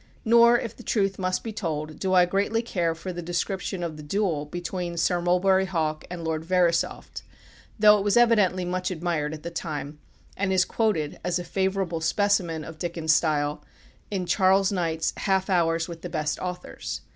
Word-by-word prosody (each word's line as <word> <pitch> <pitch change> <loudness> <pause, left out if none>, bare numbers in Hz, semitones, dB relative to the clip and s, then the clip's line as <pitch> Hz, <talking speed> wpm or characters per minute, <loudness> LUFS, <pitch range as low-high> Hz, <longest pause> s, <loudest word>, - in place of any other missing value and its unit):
Nor, 235 +1 +6
if 230 -2 -5
the - - -12
truth 195 -3 0
must 185 0 -1
be 225 - -5
told, 155 -6 -4
do 190 - -1
I 180 -1 +6
greatly 200 +5 0
care 170 -7 -1
for 180 +3 -6
the 175 - -5
description 175 +2 -3
of 160 -3 -4
the - - -8
duel 160 -2 -1
between 175 +1 -4
Sir 175 +1 +1
Mulberry 190 +2 +3
Hawk 155 -4 -2
and 175 -1 -6
Lord 160 -1 -2
Verisopht, 170 -1 0 0.6
though 210 -1 +6
it - - -2
was 205 +2 +2
evidently 210 -6 +4
very 180 - -3
much 185 0 -1
admired 165 -4 -2
at 155 -1 -8
the 170 - -5
time, 150 -3 -5 0.4
and 200 0 -1
is 185 -1 +3
quoted, 195 -10 -1
as 175 0 0
a 175 - -4
favourable 190 -2 -1
specimen 175 -3 +1
of 160 +1 -10
Dickens' 165 -2 0
style, 150 -1 0 0.5
in 190 -3 -2
Charles 190 +1 +3
Knight's 165 -4 -1
"Half 190 0 0
hours 165 -2 +2
with 170 -2 -8
the 180 - -6
Best 150 -2 -2
Authors." 180 -1 -5
180 Hz, 185 wpm, -25 LUFS, 165-195 Hz, 0.6 s, Nor